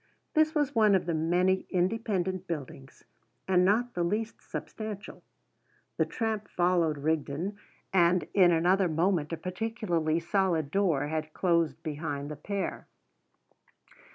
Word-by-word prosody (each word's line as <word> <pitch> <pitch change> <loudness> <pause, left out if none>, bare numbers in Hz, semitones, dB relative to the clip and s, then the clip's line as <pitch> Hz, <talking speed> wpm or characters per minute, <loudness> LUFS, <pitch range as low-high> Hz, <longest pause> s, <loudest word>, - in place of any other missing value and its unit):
This 310 0 +3
was 295 -3 +1
one 215 -3 +5
of 185 - +1
the 170 - -1
many 180 +4 +1
independent 185 -1 -1
buildings, 135 -4 -7 0.4
and 180 -1 +4
not 235 +6 +2
the 175 - -1
least 215 +6 -2
substantial. 215 -2 -7 0.8
The - - +2
tramp 220 -2 -2
followed 175 -3 +1
Rigden, 160 +5 -2 0.4
and 175 -1 +3
in 180 -3 +6
another 180 +3 +3
moment 165 -1 +1
a 165 - -2
particularly 180 -3 -1
solid 170 -4 0
door 170 -8 +2
had 155 0 -3
closed 170 -3 +1
behind 145 -2 -4
the - - -4
pair. 195 +7 -4
180 Hz, 125 wpm, -29 LUFS, 160-200 Hz, 0.8 s, in